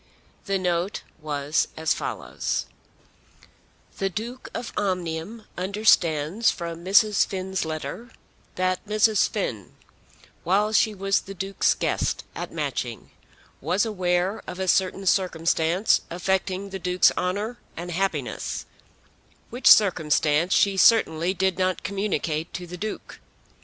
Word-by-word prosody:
The 195 -1 0
note 180 +1 -1 0.2
was 150 0 0
as 160 0 +1
follows: - - -3 1.3
The 195 - 0
Duke 235 +7 -6
of 240 - -6
Omnium 185 +2 -3
understands 185 -1 +2
from 170 -1 -5
Mrs. 205 +3 +4
Finn's 190 -1 -3
letter 160 +9 -5 0.5
that 185 0 0
Mrs. 215 0 +3
Finn, 120 - -4 0.7
while 205 +5 +2
she 215 -1 +3
was 195 0 +1
the 195 - -10
Duke's 195 +2 +1
guest - - -1
at - - -5
Matching, - - -4 0.5
was 200 +5 +1
aware 185 -1 0
of 180 - -7
a 190 - -2
certain 190 +1 +1
circumstance 170 0 +2
affecting 190 +2 -1
the 190 - -5
Duke's 180 0 +3
honour 205 +6 -2 0.2
and 175 +1 -5
happiness, 165 - -2 0.9
which 245 +3 -1
circumstance 160 -4 +4
she 200 -1 +3
certainly 185 -4 +4
did 190 -1 0
not 185 0 0
communicate 175 -6 -2
to 180 - -5
the 175 +1 -8
Duke. 210 +4 -6
185 Hz, 120 wpm, -25 LUFS, 170-200 Hz, 1.3 s, Mrs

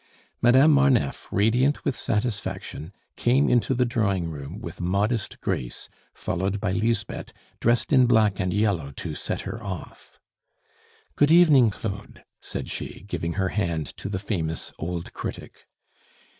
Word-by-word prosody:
Madame 130 +6 +6
Marneffe, 140 - +2
radiant 120 +8 +2
with 140 - 0
satisfaction, 105 -6 -3 0.2
came 130 +4 +3
into 125 +2 +2
the 125 +1 +2
drawing 100 -8 0
room 75 +4 -7
with 115 - -8
modest 100 +4 0
grace, - - -3 0.2
followed 95 +3 -2
by 100 -2 -1
Lisbeth 110 +2 -1 0.3
dressed 120 +5 +2
in 130 -2 +6
black 110 -4 +3
and 90 -2 0
yellow 100 -7 +1
to 75 +3 -6
set - - -4
her 115 - -6
off. 95 -5 -8 1.0
"Good 145 - +4
evening, 155 -9 +7
Claude," 100 -1 -6 0.2
said - - -5
she, - - -6
giving 85 -3 -3
her 95 0 0
hand 85 -8 -2
to - - -5
the 100 - -2
famous 85 -5 -3
old 85 +1 -4
critic. - - -7
105 Hz, 140 wpm, -25 LUFS, 90-120 Hz, 1.0 s, evening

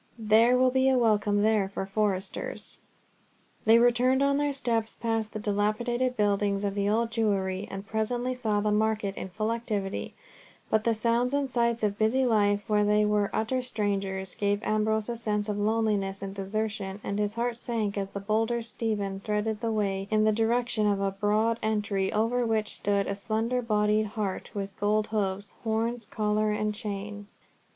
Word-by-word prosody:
There 225 +3 +4
will 255 0 +4
be 260 +1 +3
a 260 - +3
welcome 210 -3 +2
there 215 -3 +2
for 195 -1 -4
foresters." 195 -1 -2 0.9
They 225 +1 +7
returned 245 +3 +3
on 280 0 +2
their 290 0 +1
steps 230 -5 -1
past 225 -2 -2
the - - -5
dilapidated 220 +5 0
buildings 205 -1 +1
of 200 -1 -1
the 200 0 0
old 230 +2 +1
Jewry, 200 -3 0
and 195 +1 -6
presently 240 +4 -1
saw 220 -5 0
the 210 0 +1
market 215 -2 0
in 190 - -6
full 215 +4 -2
activity; 210 -4 -3 0.6
but 220 0 +2
the 230 -1 +3
sounds 235 +4 +1
and 280 -2 -1
sights 235 -1 +1
of 205 -1 0
busy 240 +5 +3
life 205 -3 +2
where 210 -2 +2
they 210 0 +3
were 210 -1 +1
utter 255 +4 0
strangers, 195 -5 -2
gave 205 0 -1
Ambrose 215 0 +1
a 240 - -3
sense 210 -2 -1
of 205 -1 -2
loneliness 205 -2 0
and 195 0 -5
desertion, 200 0 -3
and 200 +1 -2
his 210 0 -1
heart 235 0 -1
sank 225 -4 -2
as 195 -1 -2
the 200 - -5
bolder 225 +3 0
Stephen 210 -4 -3
threaded 210 +1 -2
the 230 -1 -1
way 195 -2 -1
in 215 0 +3
the 215 - +4
direction 225 0 +1
of 200 -1 +1
a 195 0 0
broad 215 +3 +1
entry 205 -3 0
over 230 +3 +1
which 220 -2 0
stood 200 -1 +1
a - - -2
slender 225 +5 -1
bodied 215 -1 +1
hart 205 -2 -4
with 195 -1 -4
gold 210 +1 +2
hoofs, 200 -2 -2
horns, 230 +1 -1
collar, 210 0 0
and 210 0 -1
chain. 205 -1 -5
215 Hz, 175 wpm, -28 LUFS, 205-230 Hz, 0.9 s, They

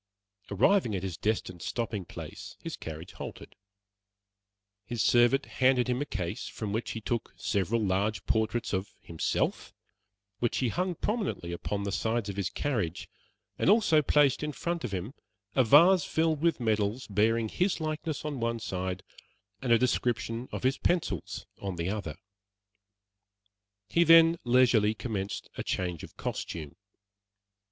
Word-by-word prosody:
Arriving 115 - +3
at 95 - -3
his 95 -4 -3
destined 95 -2 -2
stopping 110 -4 -3
place, - - -9
his - - -6
carriage 80 +2 -8
halted. - - -9 1.3
His 110 +1 -2
servant 120 +3 +4
handed 130 -1 +2
him 125 +1 0
a 145 - -2
case 85 -8 -4
from 105 -2 -5
which 115 +2 -2
he 110 - -5
took 115 +1 -3
several 100 +2 0
large 100 +1 0
portraits 110 +1 0
of 95 +1 -1
himself, 80 -1 -2 0.6
which 120 - 0
he 125 - +1
hung 180 +6 -1
prominently 205 - -2
upon 100 +4 -3
the 100 - -2
sides 110 +1 -1
of 100 - -4
his 95 -2 -1
carriage, 105 - -2 0.5
and - - +3
also 200 -8 +5
placed 145 -1 +3
in 150 0 -3
front 170 +1 -3
of 120 - -3
him 95 +6 -4 0.4
a 130 - +5
vase 165 +9 +7
filled 160 -1 0
with 165 -3 +2
medals 110 +1 0
bearing 110 +2 +2
his 180 - 0
likeness 155 -1 -3
on 145 -3 -3
one 115 0 0
side 95 -3 -3 0.6
and 130 -3 -1
a 115 - +7
description 120 -1 -1
of - - -5
his 130 +2 +1
pencils 175 -1 -1 0.2
on 95 -2 -3
the 85 +2 -2
other. 100 -8 -4 1.7
He 170 +9 +3
then 165 0 +7
leisurely 120 -4 +4
commenced 105 -4 -4
a - - -3
change 90 -3 -2
of - - -11
costume. 75 -4 -5
115 Hz, 150 wpm, -29 LUFS, 100-145 Hz, 1.7 s, vase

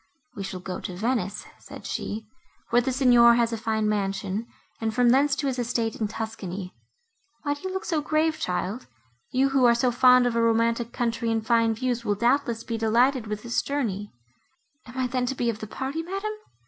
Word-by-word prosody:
"We 200 - -6
shall 190 -1 -5
go 185 0 -5
to 180 - -6
Venice," 215 -1 -1
said - - -11
she, 220 +2 -4 0.5
"where 240 - +5
the 260 +2 -1
Signor 245 -2 +6
has 235 -1 +1
a - - +1
fine 220 -1 -1
mansion, 200 +1 -1 0.3
and 225 -1 -1
from 245 -1 +4
thence 275 +3 +4
to 285 - -3
his 260 -2 -1
estate 230 -2 -1
in 215 - -1
Tuscany. 205 -4 -6 0.7
Why 290 -1 0
do 290 - -10
you 375 - -4
look 380 0 -4
so 320 -4 0
grave, 310 +1 +1
child?—You, 180 - -3
who 270 -1 +2
are 235 -1 +6
so 245 +1 +2
fond 250 +1 +6
of 240 -1 0
a 230 - +2
romantic 230 +1 +2
country 230 -1 -1
and 225 -1 -1
fine 230 -1 +3
views, 245 0 -1
will 205 -3 0
doubtless 235 +1 +1
be 230 -1 -4
delighted 235 +2 +2
with 210 0 -4
this 235 0 0
journey." 210 -8 -3 0.8
"Am 245 +2 -11
I 260 - +1
then 250 0 -1
to 270 - -2
be 240 -2 0
of 215 - -9
the 215 - -6
party, 270 +8 -4
madam?" 390 +5 -4
235 Hz, 200 wpm, -26 LUFS, 215-255 Hz, 0.8 s, Signor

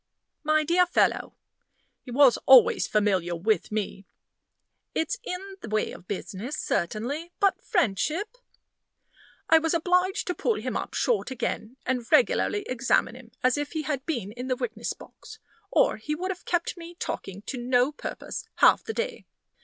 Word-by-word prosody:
"My 310 0 +3
dear 350 +3 +3
fellow" - - +1 0.7
he - - -13
was 255 0 +5
always 260 -3 +7
familiar 190 -5 +1
with 210 +7 0
me 200 -2 -3 0.9
"it's 325 +10 -1
in 385 +2 -6
the 220 - -7
way 215 0 0
of 175 - -12
business, 205 +7 -5
certainly; 265 - -2
but 395 -1 +2
friendship 355 - 0 0.6
" - - -31
I 325 - +8
was 325 +1 0
obliged 360 +4 +1
to 360 - -1
pull 450 +5 0
him - - -4
up - - -4
short 475 - +1
again, 250 -1 -4
and 245 -2 -2
regularly 415 -4 +3
examine 250 -3 +1
him 250 -2 -13
as 255 +2 +3
if 290 +2 -4
he 315 -1 -2
had 275 -2 -2
been 235 - -2
in 245 +3 -6
the 255 - +1
witness 235 -2 -3
box, - - -13 0.3
or - - +3
he 300 +8 -3
would 370 +4 -2
have 360 - -8
kept 350 +1 -1
me 340 0 -10
talking 195 - -5
to 255 - -5
no 245 +2 +2
purpose 300 - -7
half - - +5
the 445 - -4
day. 470 +1 -4
280 Hz, 165 wpm, -26 LUFS, 230-350 Hz, 0.9 s, I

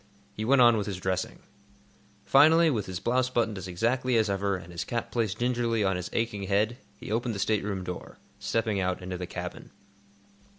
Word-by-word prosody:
He 110 - -4
went 130 +1 +5
on 120 -1 +6
with 105 - -2
his 100 -3 -3
dressing. 95 0 -3 0.8
Finally, 160 +8 +6
with 110 -7 -2
his 90 -1 -4
blouse 125 +3 +1
buttoned 115 -5 0
as 95 - -7
exactly 120 +7 +1
as 110 -2 +2
ever, 100 0 0
and 90 -1 -11
his 85 +3 -3
cap 115 +2 -4
placed 110 -6 -1
gingerly 120 -2 0
on 95 -1 +1
his 90 0 -4
aching 115 -3 -1
head, 105 +5 +1 0.2
he - - -8
opened 115 0 -1
the - - -4
stateroom 100 -2 0
door, 90 -1 -7 0.2
stepping 110 -3 0
out 95 0 -1
into 90 -1 -5
the 90 - -4
cabin. - - -7
105 Hz, 195 wpm, -28 LUFS, 95-120 Hz, 0.8 s, on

